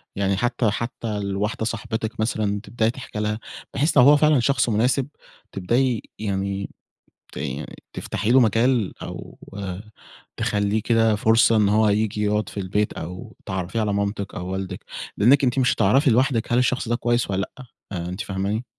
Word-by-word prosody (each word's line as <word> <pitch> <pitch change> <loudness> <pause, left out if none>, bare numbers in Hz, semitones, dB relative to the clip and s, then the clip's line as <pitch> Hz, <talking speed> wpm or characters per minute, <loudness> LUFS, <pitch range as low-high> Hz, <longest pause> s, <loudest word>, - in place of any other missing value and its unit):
يعني 100 -1 0
حتى 120 -1 +1
حتى 115 -2 -3
لواحدة 100 +2 -2
صاحبتِك 110 -1 -4
مثلًا 105 -2 0
تبدأي 115 -1 0
تحكي 125 -4 -7
لها 105 0 -1 0.3
بحيث 150 +4 +1
لو - - +8
هو 145 +3 +7
فعلًا 150 -2 +4
شخص 125 -1 +2
مناسب 125 +5 +2 0.4
تبدأي 120 +5 +1 0.2
يعني 100 -1 -2 0.6
ت - - -6 0.5
تفتحي 115 - -2
له 130 - +7
مجال 115 -1 +2
أو - - -8 1.0
تخلّيه 105 +1 0
كده 115 -1 +3
فرصة 115 +2 +4
إن 105 -2 +4
هو 110 +1 +4
هييجي 105 0 +1
يقعد 105 +1 0
في 100 - -6
البيت، 105 +2 -1
أو 90 +2 -8
تعرّفيه 95 +3 -3
على 105 -1 0
مامتِك 100 0 -2
أو 90 - -5
والدِك 95 0 -5 0.3
لإنِك 135 +6 +5
أنتِ 130 +1 +2
مش 125 - +3
هتعرفي 135 +8 +4
لوحدِك 120 -1 +2
هل 120 - +4
الشخص 125 -1 +1
ده 120 - +2
كويس 120 -3 0
والّا 95 +1 -2
لأ، 130 - -10 0.3
آآ 90 -2 -4
أنتِ 95 +4 -5
فاهماني؟ 100 +4 -2
110 Hz, 165 wpm, -23 LUFS, 100-120 Hz, 1.0 s, لو